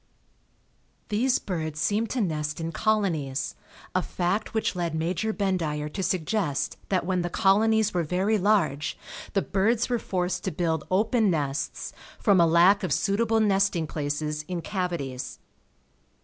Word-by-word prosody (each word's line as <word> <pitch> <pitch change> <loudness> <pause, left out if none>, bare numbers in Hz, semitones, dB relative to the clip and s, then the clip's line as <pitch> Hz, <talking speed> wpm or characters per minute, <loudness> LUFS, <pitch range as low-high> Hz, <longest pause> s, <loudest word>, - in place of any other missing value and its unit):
These 245 +5 +2
birds 155 -5 -4
seem 210 +6 +1
to 250 +2 -1
nest 155 -5 -2
in 165 0 -3
colonies, 165 -10 0 0.4
a 185 - +2
fact 185 +6 -2
which 220 - 0
led 170 -3 -2
Major 175 +7 -1
Bendire 165 -8 -1
to 195 - -3
suggest 185 -4 -1
that 185 -3 +1
when 185 0 0
the 175 - -2
colonies 215 +3 +3
were 175 - +1
very 185 +6 +1
large 155 -8 +1 0.4
the 195 - +2
birds 220 +5 +1
were 240 -1 +1
forced 180 -3 -2
to - - 0
build 160 -1 -1
open 215 +3 +2
nests 145 -4 -2 0.2
from 195 -4 +4
a 170 - +5
lack 175 +5 +5
of 185 -5 -2
suitable 220 +6 +2
nesting 195 -5 +2
places 150 0 -3
in 180 -2 -3
cavities. 170 -10 -3
180 Hz, 145 wpm, -26 LUFS, 160-210 Hz, 0.4 s, a